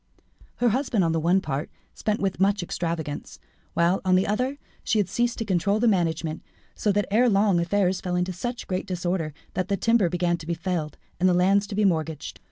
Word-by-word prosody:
Her 245 - +2
husband, 240 -4 +1
on 165 - +2
the 165 - +1
one 175 +4 +3
part, 145 -2 -3 0.2
spent 215 0 -1
with 195 -2 -1
much 195 0 +2
extravagance, 165 -4 -4 0.4
while, 170 +3 +2
on 185 -1 +3
the 185 - +3
other, 255 +7 -1 0.3
she 220 - +1
had 205 -4 +2
ceased 240 0 0
to 225 - -3
control 200 +2 +1
the 240 - +3
management, 165 -5 0 0.3
so 210 - 0
that 205 +1 +1
ere 240 +4 +4
long 200 -3 +3
affairs 185 +1 +1
fell 180 -2 -2
into 180 +1 0
such 240 +7 -4
great 185 0 -3
disorder, 175 -3 -2 0.2
that 185 - -1
the 200 - 0
timber 225 -3 +3
began 175 0 0
to 160 -1 -11
be 170 - -1
felled, 165 -4 -3 0.2
and 185 +1 +4
the 180 - +3
lands 195 +3 +3
to 200 - -5
be 210 0 +2
mortgaged. 160 -4 -1
185 Hz, 210 wpm, -25 LUFS, 170-205 Hz, 0.4 s, ere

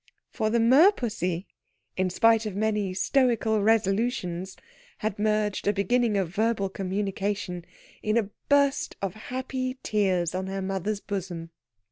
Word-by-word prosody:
For 215 -3 -1
the 235 - +2
merpussy, 230 - +3 0.5
in 185 0 +1
spite 225 +3 +3
of 200 - -5
many 210 -2 0
stoical 225 0 +2
resolutions, 195 -3 0 0.4
had 210 -1 -3
merged 210 -1 0
a 205 - +4
beginning 215 +2 +1
of 190 -4 0
verbal 215 -2 +1
communication 195 -1 -3 0.4
in 215 +1 +1
a 210 -3 0 0.2
burst 280 -1 +2
of 190 -3 -1
happy 255 +3 -4
tears 185 -5 +1
on 185 +1 -3
her 195 0 -3
mother's 195 +2 -2
bosom. 175 -4 -5
210 Hz, 130 wpm, -27 LUFS, 190-225 Hz, 0.5 s, a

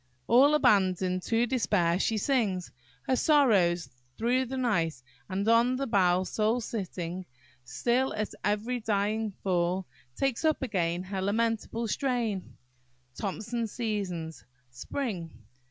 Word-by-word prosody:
"All 275 - +6
abandoned 185 - +3
to 230 +1 +2
despair, 205 -9 +1
she 220 +2 +1
sings 205 -7 0 0.3
Her 260 - +1
sorrows 200 - +3 0.3
through 250 +3 +1
the 265 +2 -5
night; 170 - 0 0.3
and 195 +3 -2
on 235 +2 +4
the 275 +2 -2
bough 185 -6 +3
Sole 220 +5 0
sitting, 185 -5 -5 0.4
still 240 - 0
at 215 0 -2
every 210 +5 0
dying 215 0 0
fall 180 0 0 0.3
Takes 270 +1 -1
up 310 -3 +2
again 180 -6 -1
her 190 0 -4
lamentable 225 +3 -1
strain." 230 -6 -2 0.6
THOMSON'S 220 - -3
Seasons–Spring. 170 - -4
210 Hz, 115 wpm, -29 LUFS, 180-240 Hz, 0.6 s, All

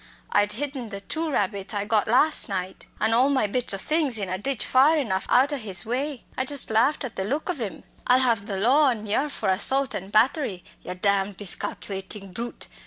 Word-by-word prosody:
I'd 205 0 +2
hidden 265 -1 -4
the 200 -2 -6
two 320 +10 -2
rabbits 200 -5 -1
I 205 0 -2
got 210 -1 +1
las' 255 +6 +3
night, 185 -1 -5
and 220 +1 +1
all 250 +4 +4
my 265 -6 +2
bits 245 +4 0
o' 195 - +1
things 295 +1 +1
in 200 -3 -4
a 185 - -2
ditch 270 +2 -1
far 280 +5 +4
enough 205 -10 -2
out 270 +4 +4
o' - - -1
his 195 -7 -4
way. 260 +3 -3
I 260 - -1
just 275 -3 +1
laughed 235 +8 +2
at 255 - -6
the 190 - -1
look 285 - -2
ov 300 -8 -6
'im. 210 -4 -5 0.2
'I'll 250 - +6
have 230 -6 +3
the 195 - -3
law 260 +10 +4
on 235 -5 0
yer 245 +8 0
for 215 -8 -3
assault 265 +8 +1
an' 190 +1 -5
battery, 215 - +2 0.2
yer 180 - -7
damned 200 +1 0
miscalculatin' 195 0 -4
brute!' 235 +5 -6
225 Hz, 215 wpm, -24 LUFS, 200-270 Hz, 0.2 s, I'll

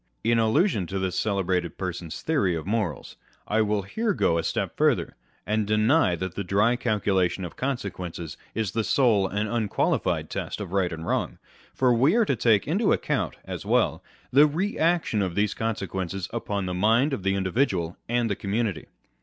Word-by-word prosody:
In 115 +1 +3
allusion 110 - +2
to 95 - -3
this 95 -1 -1
celebrated 95 -5 -1
person's 90 -3 -5
theory 135 - +1
of 80 - -5
morals, 100 - -2 0.3
I 110 +1 +2
will 105 -2 0
here 215 - -1
go 85 0 +2
a - - -2
step - - -2
farther, - - +1 0.3
and 105 0 0
deny 110 - +3
that 95 +1 -4
the 100 - -3
dry 105 +6 +2
calcu 105 -5 0
lation 95 0 +1
of 85 - -8
consequences 90 - -4 0.2
is 110 -4 -1
the 115 +2 -1
sole 110 -6 +3
and 105 +3 -2
unqualified 110 -2 0
test - - -4
of 100 -4 -6
right 95 -2 +1
and 80 0 -6
wrong; - - -1 0.4
for 125 -2 +3
we 135 - +3
are 235 -2 +4
to 140 - +1
take 110 -3 +3
into 195 +9 0
the - - +5
account - - -1
(as - - -6
well) - - +1 0.3
the 145 +3 +7
re 185 +8 -2
action 160 -9 +1
of 90 -3 -2
these 105 0 +1
consequences 95 -5 -3
upon 100 -4 -2
the 90 - -3
mind 115 +10 +3
of 120 - -2
the 95 +1 +1
individual 95 -3 0
and 120 0 +1
the 100 - -1
community. 105 +1 -2
105 Hz, 185 wpm, -26 LUFS, 95-120 Hz, 0.4 s, the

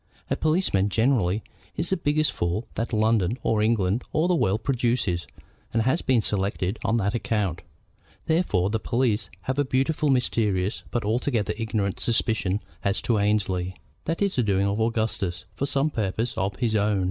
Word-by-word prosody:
A - - +3
policeman, 155 - +1
generally, 110 -3 +2 0.3
is 170 +3 -1
the - - +4
biggest 155 -3 +1
fool 85 +7 -2
that 115 - -3
London, 110 -1 +2
or 110 -1 +2
England, 105 -1 +2
or 155 +3 +2
the 180 - +3
world 115 - +1
produces, 120 -9 0 0.5
and 115 -1 +2
has 130 +8 +2
been 125 -4 +2
selected 100 0 -1
on 115 - +2
that 100 -1 0
account. 105 -7 -1 0.6
Therefore 105 - +1
the 110 - 0
police 115 -2 0
have 130 +6 -2
a - - +4
beautifully 140 +3 +1
mysterious 105 -6 +1
but 120 -4 -2
altogether 110 -1 0
ignorant 105 -3 -1
suspicion 110 -4 0 0.2
as 100 +1 +1
to 115 -3 +2
Annesley. 95 -3 0 0.3
That 165 +5 0
is 200 - 0
the 125 - +3
doing 100 -3 +2
of 100 +2 0
Augustus, 110 -5 -1
for 140 - -2
some 140 +2 +1
purpose 110 +2 -1
of 95 0 -1
his 115 0 0
own. 105 -1 +2
110 Hz, 170 wpm, -25 LUFS, 100-130 Hz, 0.6 s, the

